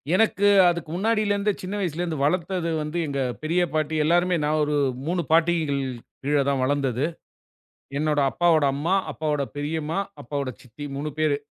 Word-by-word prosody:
எனக்கு 205 -1 +3 0.2
அதுக்கு 170 -3 -3
முன்னாடில 215 +1 +1
இருந்தே 200 0 +1
சின்ன 190 +2 -4
வயசுல 175 -4 -2
இருந்து 165 -4 -3
வளத்தது 175 +2 0
வந்து 150 +3 -4
எங்க 140 -1 -2 0.2
பெரிய 170 +3 +1
பாட்டி 155 0 0
எல்லாருமே. 175 +2 +3
நான் 155 +1 +1
ஒரு 150 0 -1 0.3
3 175 +1 0
பாட்டிகள் 160 -4 +2 0.4
கீழ 145 +2 +2
தான் 135 -2 +1
வளந்தது. 135 -1 0 0.9
என்னோட 150 -1 +1
அப்பாவோட 160 +2 +3
அம்மா, 165 +7 0 0.2
அப்பாவோட 150 -1 -1
பெரியம்மா, 155 +3 -2 0.2
அப்பாவோட 140 +1 -3
சித்தி 135 +4 -9
3 150 +2 -3
பேரு. 155 -2 +2
155 Hz, 150 wpm, -24 LUFS, 145-175 Hz, 0.9 s, எனக்கு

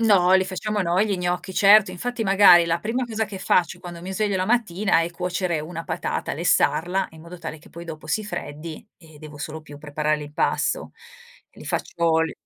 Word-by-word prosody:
No, 195 -5 +4
li 190 0 +5
facciamo 205 +3 -3
noi, 185 +4 +2
gli 200 -2 -1
gnocchi, 180 +1 -2
certo. 200 0 +6
Infatti, 245 +5 -3
magari, 195 -3 +7
la 170 0 0
prima 240 +6 -1
cosa 225 -2 -2
che 195 -2 -8
faccio 180 -2 +1
quando 175 -1 -9
mi 185 +2 -6
sveglio 205 0 0
la 185 0 -1
mattina 215 -6 +2
è 165 +1 -2
cuocere 175 -2 -2
1 165 +1 -6
patata, - - -3
lessarla 180 +4 +1
in 160 -1 -14
modo 170 +2 -11
tale 155 - -7
che - - -18
poi, 170 +1 -10
dopo, 155 -2 -9
si 215 +7 0
freddi 155 -2 -7
e 160 -3 -17
devo 150 -1 -11
solo 155 +2 -6
più 145 -1 -12
preparare 150 +1 -1
l'impasto. 150 - -1 0.6
Li - - -14
faccio, 165 -1 0
l 165 - -2
175 Hz, 200 wpm, -23 LUFS, 160-200 Hz, 0.6 s, magari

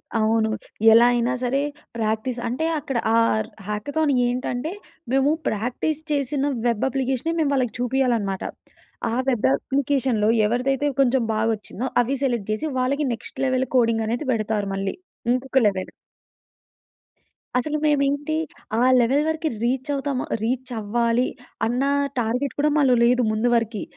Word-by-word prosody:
అవును. 220 0 +2 0.4
ఎలా 230 +1 +7
అయినా 240 +1 +1
సరే 265 +3 +1 0.4
ప్రాక్టీస్ 220 +3 -1
అంటే 255 +7 -1
అక్కడ 270 -3 -3 0.2
ఆ‌‌ర్ 225 -1 +2 0.2
హ్యాకథాన్ 285 +9 -1 0.2
ఏంటంటే 245 +4 -2 0.4
మేము 270 +2 +3 0.2
ప్రాక్టీస్ 245 +8 -1
చేసిన 285 0 0
వెబ్ 235 -1 +1
అప్లికేష‌నే 265 +3 -1
మేము 305 -3 +2
వాళ్ళకి 250 -5 0
చూపియాలన్నమాట. 240 -6 0 0.7
ఆ - - -2 0.2
వెబ్ 240 - +1
అప్లికేషన్‌లో 265 - 0 0.2
ఎవరిదైతే 260 +5 0
కొంచెం 260 -1 +3
బాగొచ్చిందో 220 +2 -2 0.2
అవి 270 +4 -1
సెలెక్ట్ 240 -6 -1
చేసి 215 +9 -2
వాళ్ళకి 280 +4 0
నెక్స్ట్ 230 +3 -7
లెవెల్ 260 0 +1
కోడింగ్ 230 -2 +2
అనేది 240 +6 -2
పెడతారు 215 -2 -1
మళ్ళీ. 195 0 -2 0.4
ఇంకొక 265 +1 +1
లెవెల్. 190 -2 -2 1.7
అసలు 300 +5 0
మేమేంటి 290 +1 +1 0.4
ఆ - - +2 0.2
లెవెల్ 265 +5 +3
వరకి 320 0 -1
రీచ్ 260 +4 -1
అవుతాము 275 -2 -2 0.2
రీచ్ 250 +3 -2
అవ్వాలి 235 +3 +1 0.4
అన్న 245 +3 0 0.4
టార్గెట్ 245 +4 -1
కూడా 300 +1 +3
మాలో 270 -4 +4
లేదు 250 +1 +3
ముందు 215 +3 +1
వర‌కి. 230 -2 -1
250 Hz, 130 wpm, -23 LUFS, 225-275 Hz, 1.7 s, ఎలా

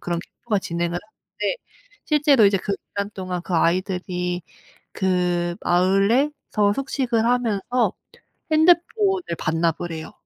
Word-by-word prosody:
그런 175 -1 -2
캠프가 215 +3 -3
진행을 170 -3 -2
하는데 220 - -5 0.5
실제로 290 -6 +4
이제 200 0 +3
그 200 - -3
기간 200 0 -5
동안 185 -2 -4
그 175 - -4
아이들이 180 0 0 0.5
그 180 -2 0
마을에서 205 - +2
숙식을 260 -4 0
하면서 240 -2 +1 0.6
핸드폰을 355 +4 +3 0.2
반납을 165 +1 -1
해요. 160 0 -7
200 Hz, 270 characters per minute, -23 LUFS, 175-245 Hz, 0.6 s, 실제로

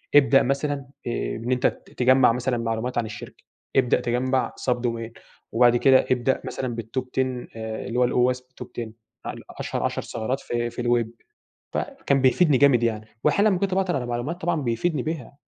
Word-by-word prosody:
"ابدأ 135 -1 +6
مثلًا 140 +3 0 0.3
آآ 120 - -2
بإن 120 +3 -4
أنت 125 - +3
ت - - -6
تجمّع 130 -1 +5
مثلًا 125 +1 -1
معلومات 115 +2 -2
عن 115 - +1
الشركة، 105 -1 -9 0.3
ابدأ 130 -2 +4
تجمّع 130 +2 0
سابد 125 -1 -1
وير 115 -1 -3 0.4
وبعد 120 +1 +5
كده 130 +1 +5
ابدأ 130 +1 +1
مثلًا - - -5 0.2
بالtop 120 +4 -3
10 130 -2 -1
آآ 110 0 -5
اللي 125 +1 -1
هو - - +5
هو 125 +1 +3
اسمه 125 0 -7 0.2
top - - -13
10 120 -2 -6 0.4
ال - - -5 0.2
أشهر - - -2
10 - - -1
ثغرات 120 +4 -3
في 120 0 -2
في 120 +1 -5
الweb. 120 -1 0 0.5
فكان 135 -1 0
بيفيدني 135 +2 +4
جامد 130 -4 +5
يعني. 110 -2 -1 0.2
وأحيانًا 200 +8 +4
لمّا 185 -3 +1
كنت 195 -2 0
باعطل 190 -3 +1
على 125 -3 -2
معلومات 120 +9 -3
طبعًا 165 -2 0
بيفيدني 130 +4 0
بها، 150 -4 -5
125 Hz, 185 wpm, -24 LUFS, 120-135 Hz, 0.5 s, ابدأ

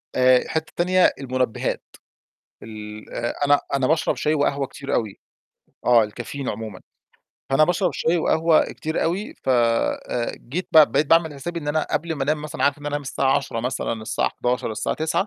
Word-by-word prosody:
آآ، 130 0 +4
حتة 160 0 -3
تانية 185 +1 +4
المنبهات، 130 -3 -2 0.8
ال 105 -1 -9
آآ 120 0 -2
أنا 145 0 +5
أنا 135 -2 +2
باشرب 160 0 +1
شاي 150 - 0
وقهوة 140 -2 0
كتير 140 - -4
آوي، 110 -4 -2 0.7
آه، 120 -3 +5
الكافيين 120 +5 -6
عمومًا. 105 -3 -5 0.7
فأنا 135 +3 +5
باشرب 180 +2 0
شاي 170 +2 +1
وقهوة 160 0 +3
كتير 160 +1 -3
أوي 185 +6 -2
ف - - -5
آآ 120 0 +1
جيت 170 +10 -5
ب - - +3 0.2
بقيت 150 - +2
باعمل 165 -2 +3
حسابي 170 +5 -5
إن 145 - -5
أنا 155 +1 0
قبل 170 0 -1
ما 140 - -3
أنام 150 +1 0
مثلًا، 150 - -3
عارف 145 +1 +2
إن 145 - -13
هانام 145 0 -1
الساعة 135 0 +1
22:00 130 -4 -3
مثلًا، 125 -1 -2
الساعة - - 0
23:00، 125 -2 0
الساعة 110 - -2
21:00، 160 +5 0
140 Hz, 175 wpm, -23 LUFS, 120-160 Hz, 0.8 s, أنا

